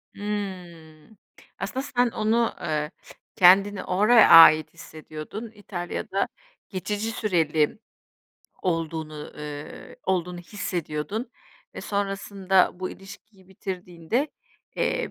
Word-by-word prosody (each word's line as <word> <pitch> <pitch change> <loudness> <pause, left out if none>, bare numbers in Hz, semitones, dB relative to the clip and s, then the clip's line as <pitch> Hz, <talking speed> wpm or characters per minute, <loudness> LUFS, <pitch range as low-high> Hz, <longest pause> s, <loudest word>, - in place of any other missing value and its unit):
Imm, 185 -4 -6 0.2
k - - -19
aslında 265 - -3
sen 245 -3 +1
onu, 225 +2 +1
eee, 150 0 -2 0.4
kendini 195 +2 +5
oraya 215 +5 +5
ait 155 -1 +9
hissediyordun, 155 +8 -9
İtalya'da 190 -4 -3 0.4
geçici 205 +4 -3
süreli 165 -6 +1 0.8
olduğunu 160 -3 -2 0.2
ııı, 150 0 -8
olduğunu 180 -1 -1
hissediyordun 185 - -4 0.4
ve - - -6
sonrasında 195 -2 +1
bu 185 - -3
ilişkiyi 195 0 -14
bitirdiğinde, 185 - -3 0.5
eee, - - -1
185 Hz, 90 wpm, -25 LUFS, 165-210 Hz, 0.8 s, ait